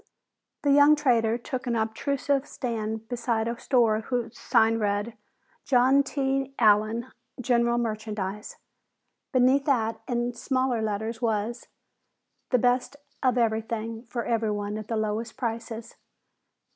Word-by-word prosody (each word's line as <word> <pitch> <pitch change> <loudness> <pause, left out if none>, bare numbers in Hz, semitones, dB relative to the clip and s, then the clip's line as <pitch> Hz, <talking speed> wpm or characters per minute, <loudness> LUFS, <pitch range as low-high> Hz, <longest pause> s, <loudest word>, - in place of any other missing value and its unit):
The 285 - +3
young 290 +2 +7
trader 235 -6 +2
took 250 +1 -5
an 235 - 0
unobtrusive 275 +5 -1
stand 225 -3 -4
beside 230 -2 -1
a 235 0 -3
store 230 -5 +3
whose 240 0 -3
sign 225 +1 +2
read 205 +2 -1 0.5
"JOHN 260 +2 +4
T. 270 -1 -2
ALLEN, 220 +2 +3 0.3
GENERAL 235 -1 +2
MERCHANDISE." 215 -3 -3 0.8
Beneath 260 +2 +3
that, 225 -5 0
in 240 -1 -1
smaller 255 -2 0
letters 220 +2 -3
was, 230 +1 -1 0.8
"The 250 - +4
best 250 +3 +1 0.3
of 255 -2 +2
everything 225 0 -1
for 235 0 -4
everyone 210 -2 -1
at 215 - -8
the 225 - -2
lowest 215 +2 -2
prices." 230 -2 -5
235 Hz, 120 wpm, -26 LUFS, 220-255 Hz, 0.8 s, young